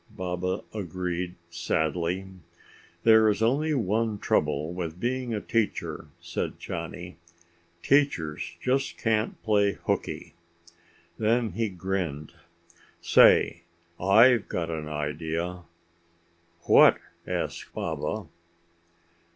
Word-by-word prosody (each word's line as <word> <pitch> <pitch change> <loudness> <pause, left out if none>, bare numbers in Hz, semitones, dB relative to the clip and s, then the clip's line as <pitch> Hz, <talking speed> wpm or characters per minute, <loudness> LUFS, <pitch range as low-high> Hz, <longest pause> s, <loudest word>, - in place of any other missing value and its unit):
Baba 90 +1 -3
agreed 90 -2 -3 0.2
sadly. 85 +2 -1 0.8
"There 110 -1 +6
is 105 +1 0
only 145 +7 +2
one 110 -1 0
trouble 80 -4 0
with 85 -1 -5
being 125 +1 -2
a 110 - -1
teacher," 110 +1 -2
said - - -4
Johnny. 90 0 -6 0.7
"Teachers 115 - +1
just 135 +2 0
can't 110 -1 0
play 100 -2 +3
hookey." - - -2 0.9
Then 115 0 +2
he 110 +4 -1
grinned. 90 -5 -3 0.7
"Say, 85 - +5 0.4
I've 110 +5 +5
got 85 -1 -3
an 80 -2 -4
idea!" 80 +4 -3 1.0
"What?" - - +6 0.3
asked - - -3
Baba. 105 -5 -3
95 Hz, 95 wpm, -27 LUFS, 85-110 Hz, 1.0 s, There